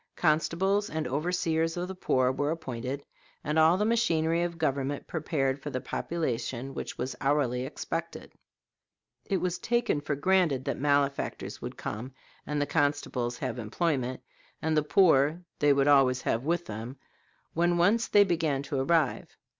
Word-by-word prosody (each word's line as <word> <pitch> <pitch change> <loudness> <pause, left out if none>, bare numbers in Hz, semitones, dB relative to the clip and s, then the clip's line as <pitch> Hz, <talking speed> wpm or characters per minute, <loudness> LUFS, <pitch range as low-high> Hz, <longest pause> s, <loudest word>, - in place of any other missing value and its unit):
Constables 185 +6 +1
and 155 -3 -2
overseers 165 +3 0
of 175 +1 -2
the 190 - -5
poor 130 -8 +1
were 145 +2 -1
appointed, 135 -3 -4 0.4
and 150 +2 +1
all 160 +3 +5
the 210 - +1
machinery 170 -8 +2
of 175 -1 -2
government 140 -2 -1
prepared 140 -4 -1
for - - -5
the 130 - -3
population 130 -5 -3
which - - -6
was 130 +2 -3
hourly 135 -3 +1
expected. 165 +3 -5 0.9
It 195 - 0
was 180 -1 -2
taken 235 -10 0
for 145 0 -2
granted 155 -4 +2
that - - -2
malefactors 140 0 0
would - - -6
come 125 +5 -6 0.3
and 150 0 -1
the 145 - +1
constables 145 -5 0
have 125 -1 -4
employment; 130 +2 -1 0.4
and 160 0 0
the 155 - +4
poor 155 0 +3 0.2
they 145 -1 +4
would 140 -1 +3
have 145 -1 +7
always 130 -1 +2
with 165 +9 0
them, 115 +5 -7 0.6
when 175 +1 +2
once 210 +7 +3
they 205 - +6
began 160 -7 0
to 140 -1 -3
arrive. 155 0 0
150 Hz, 155 wpm, -28 LUFS, 135-170 Hz, 0.9 s, have